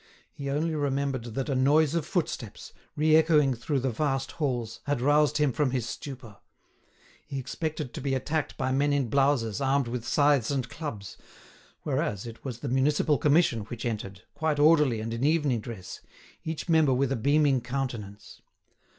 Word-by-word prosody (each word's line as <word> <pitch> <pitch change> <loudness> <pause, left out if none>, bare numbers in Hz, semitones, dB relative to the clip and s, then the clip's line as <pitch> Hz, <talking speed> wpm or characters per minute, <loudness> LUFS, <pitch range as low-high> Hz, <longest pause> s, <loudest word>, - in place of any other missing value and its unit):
He 140 -1 -6
only 155 +4 0
remembered 140 -4 -1
that 135 - -2
a 140 - -1
noise 145 +4 +3
of 165 -2 -1
footsteps, 145 - -4 0.2
re 155 +1 +4
echoing 155 -4 +4
through 130 +4 -2
the 130 0 0
vast 135 +2 -1
halls, 120 -7 -3
had 145 -2 0
roused 150 +3 +3
him 150 -3 +2
from 145 0 +1
his 125 -3 -2
stupor. 120 -4 -8 0.9
He 140 - -5
expected 150 0 -4
to - - -6
be 135 0 0
attacked 145 +4 -2
by 130 0 -1
men 145 +2 +2
in 140 -4 0
blouses, 135 -4 +1
armed 135 -1 +1
with 120 0 -4
scythes 145 -5 +3
and 135 -3 -1
clubs, 115 - -7 0.7
whereas 100 0 -2
it 115 -1 -10
was 125 -4 -6
the - - -4
Municipal 145 +3 +2
Commission 150 -5 +3
which 115 +1 -7
entered, 100 -5 -4
quite 160 -2 -1
orderly 150 -6 +4
and 115 +1 -4
in 115 +2 -3
evening 145 -5 +2
dress, 105 -5 -8 0.4
each 160 +1 -4
member 160 -6 +4
with 135 +1 +1
a - - +1
beaming 140 +2 +2
countenance. 115 -5 -5
135 Hz, 170 wpm, -27 LUFS, 120-150 Hz, 0.9 s, re